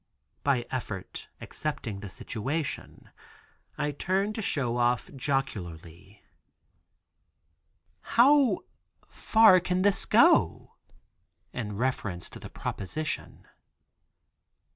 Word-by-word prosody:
By 130 -4 +1
effort 110 -7 -5
accepting 115 -9 -4
the 100 0 -7
situation, 135 - -4 0.7
I 150 0 -1
turn 190 +8 0
to 220 - -4
Show 135 - 0
Off, 120 0 +1
jocularly: 100 - -4 1.9
"How 265 -3 +5 0.5
far 220 -4 +5
can 180 +1 0
this 205 -1 +2
go?" - - +4 0.8
in 105 -4 -4
reference 105 -8 -2
to - - -10
the - - -9
proposition. 155 +11 -5
135 Hz, 85 wpm, -28 LUFS, -, 1.9 s, How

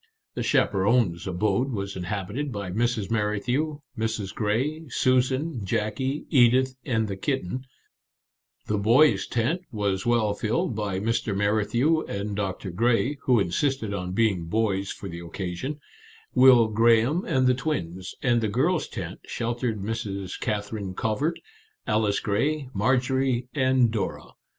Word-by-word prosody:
The - - -4
chaperons' 100 -3 +2
abode 100 +8 0
was 100 -3 -4
inhabited 100 +9 -3
by 100 -4 -4
Mrs. 115 0 -1
Merrithew, 120 +8 -1
Mrs. 110 -4 -2
Grey, 135 +10 -1
Susan, 130 +1 +1
Jackie, 115 +7 -2
Edith, 130 0 +4
and 110 -3 0
the 100 - -4
kitten; 130 +2 -2 1.0
"The 105 -1 -1
Boys' 125 +9 +4
Tent" 125 +10 0
was 100 -4 -1
well 115 -3 +2
filled 110 +2 -1
by 100 -3 -2
Mr. 110 -1 -1
Merrithew 110 +10 +2
and 100 +1 -3
Doctor 95 -1 -3
Grey 120 +8 +1
(who 125 -3 +4
insisted 110 +4 0
on 90 -2 -3
being 95 -5 +1
boys 100 0 0
for 100 - -7
the 85 -2 -7
occasion), 90 - -5 0.5
Will 125 -3 +7
Graham, 115 - +3
and 130 -1 +2
the 125 - +5
twins; 95 - -3
and 120 -2 +3
"The 110 - +1
Girls' 150 - +1
Tent" - - -6
sheltered 115 -3 -2
Miss 115 +2 -2
Kather 100 +2 -4
ine 95 -2 -5
Covert, 135 - -1 0.5
Alice 105 -2 +1
Grey, 135 +7 0
Marjorie, 125 +3 +1
and 130 -4 +3
Dora. 105 -4 -3
115 Hz, 135 wpm, -26 LUFS, 100-130 Hz, 1.0 s, Will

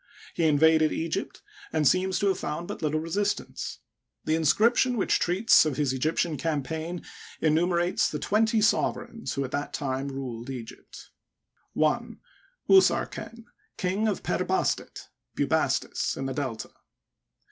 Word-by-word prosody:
He 170 - 0
invaded 155 +1 +4
Egypt, 165 0 -3 0.3
and 155 -2 +2
seems 185 +3 +2
to 200 - +1
have 190 - 0
found 170 +3 -4
but - - -6
little 155 0 0
resistance. 200 +6 -3 0.4
The 155 - +1
inscription 230 - +3
which 200 - +2
treats 190 +7 +4
of 150 -4 -2
his 140 -3 +1
Egyp 150 +5 -1
tian 165 -4 0
campaign 160 +3 -3 0.4
enumerates 175 +3 +2
the 150 - -3
twenty 220 - +1
sovereigns 230 +2 0
who 140 - -1
at 130 - -8
that 145 +1 -3
time 135 -1 -2
ruled 130 -3 -6
Egypt: 125 -4 -9 0.6
1. - - 0 0.5
Usarken, 305 -10 +2 0.3
King 195 +3 0
of 210 - -2
Per - - -1
Bastet - - -2 0.3
(Bubastis), - - 0
in 135 - -3
the 135 - -2
Delta. 130 -5 -4
160 Hz, 135 wpm, -27 LUFS, 145-195 Hz, 0.6 s, invaded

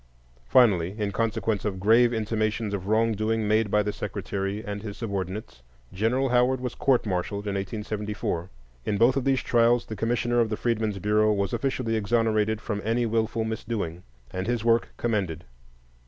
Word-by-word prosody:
Finally, 95 - +4
in 105 -2 -1
consequence 110 -1 -1
of 100 -3 -2
grave 115 +5 +5
intimations 110 -1 -1
of 95 -1 -4
wrong 110 +2 +3
doing 110 0 0
made 110 0 +2
by 105 +1 +3
the 105 0 -2
Secretary 100 0 -4
and 105 -1 -4
his 105 -2 -7
subordinates, 100 - -4 0.3
General 120 +7 +1
Howard 125 +1 +3
was 125 -1 -4
court 130 -4 +2
martialed 100 +1 -2
in 100 - -2
1874. 105 -3 -3 0.3
In 100 - -1
both 120 +4 +4
of 135 -2 -1
these 135 -2 +2
trials 120 0 +3
the 110 - -6
Commissioner 120 +3 0
of 115 -2 +2
the 110 - -2
Freedmen's 110 -4 -1
Bureau 105 +2 +2
was 100 -2 -1
officially 130 -4 -1
exonerated 110 0 +1
from 105 -2 -3
any 115 +2 +1
wilful 110 0 0
misdoing, 110 -6 -3 0.3
and 95 +2 -3
his 120 -2 -1
work 115 0 +3
commended. 95 -8 -1
110 Hz, 170 wpm, -26 LUFS, 100-115 Hz, 0.3 s, grave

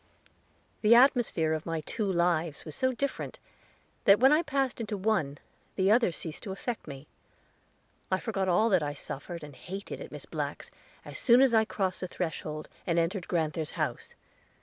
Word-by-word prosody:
The 225 +2 +6
atmosphere 240 - +4
of 155 +1 -4
my 165 -1 -2
two 205 +5 -2
lives 170 -3 0
was 155 -2 -4
so 260 0 +1
different, 275 +2 -3 0.7
that 200 +1 +7
when 265 +3 +6
I 305 +2 +5
passed 275 -6 -1
into 215 -2 -3
one, 185 -9 0 0.4
the 190 +1 +3
other 230 -4 +4
ceased 160 -1 -7
to 195 - -6
affect 220 +2 -5
me. 140 -1 -8 1.0
I 185 - +1
forgot 195 -4 -1
all 195 +6 +4
that 185 -5 +4
I 145 -1 -3
suffered 170 +4 -7
and 145 -2 -10
hated 195 +7 -7
at - - -8
Miss - - -8
Black's, - - -5 0.3
as - - -7
soon 240 -1 +6
as 265 -2 +5
I 220 -1 +5
crossed 190 -4 -2
the 185 - -3
threshold, 155 -3 -4 0.2
and 170 -1 +1
entered 170 +2 0
grand'ther's 160 -2 -1
house. - - -3
190 Hz, 175 wpm, -29 LUFS, 160-225 Hz, 1.0 s, that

